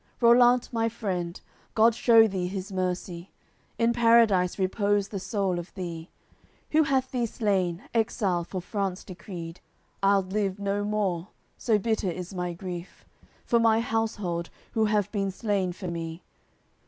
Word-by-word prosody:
CCX - - -37
"Rollant, 245 +1 +5
my 230 0 +1
friend, 185 -6 -3 0.4
God 225 +1 +5
shew 225 -1 +6
thee 185 -3 -2
His 190 +1 -5
mercy! 180 -1 -3 0.5
In 230 0 +2
Paradise 230 -6 +4
repose 200 +1 +1
the 200 - -4
soul 195 -3 -1
of 175 - -8
thee! 170 -3 -6 0.6
Who 315 - +5
hath 265 -3 +1
thee 245 -2 0
slain, 190 -5 -1
exile 200 -6 +1
for 185 +2 -5
France 195 -1 -3
decreed. 175 -3 -8 0.4
I'ld 195 -1 +2
live 200 -2 0
no 200 0 -1
more, 200 -4 -1 0.3
so 225 -3 +1
bitter 215 -2 0
is 180 +2 -6
my 180 -1 -2
grief 175 0 -8 0.4
For 235 - +3
my 225 -1 +4
household, 215 -7 -2 0.2
who 220 -1 +2
have 210 -2 +1
been 195 -2 -1
slain 195 -2 -1
for 185 +1 -7
me. 165 0 -5
195 Hz, 150 wpm, -27 LUFS, 180-225 Hz, 0.6 s, shew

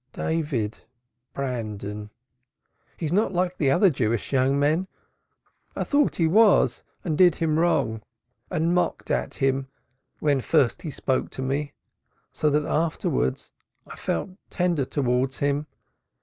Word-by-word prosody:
"David 145 -10 -2 0.5
Brandon. 105 -5 -4 0.9
He 165 - -4
is 155 - -1
not 205 +2 +2
like 180 0 -1
other 170 +7 +4
Jewish 115 -2 -1
young 135 +1 +3
men; 155 +6 +1 0.9
I - - -1
thought 290 -1 +2
he 165 - +2
was 210 +5 +4 0.2
and 160 -4 -1
did 175 0 +5
him 160 -1 0
wrong 110 -10 +1 0.5
and 165 +2 +1
mocked 180 - -1
at - - -1
him 135 -1 0 0.5
when 145 -3 +2
first 140 -3 +2
he 170 - -5
spoke 135 -2 -1
to 130 - -6
me, 140 +2 -2 0.6
so 150 - +1
that 150 0 +1
afterwards 150 - -1 0.3
I - - -10
felt 85 - -2 0.2
tender 175 -6 0
towards 130 -1 0
him. 145 +1 0
145 Hz, 135 wpm, -25 LUFS, 130-165 Hz, 0.9 s, did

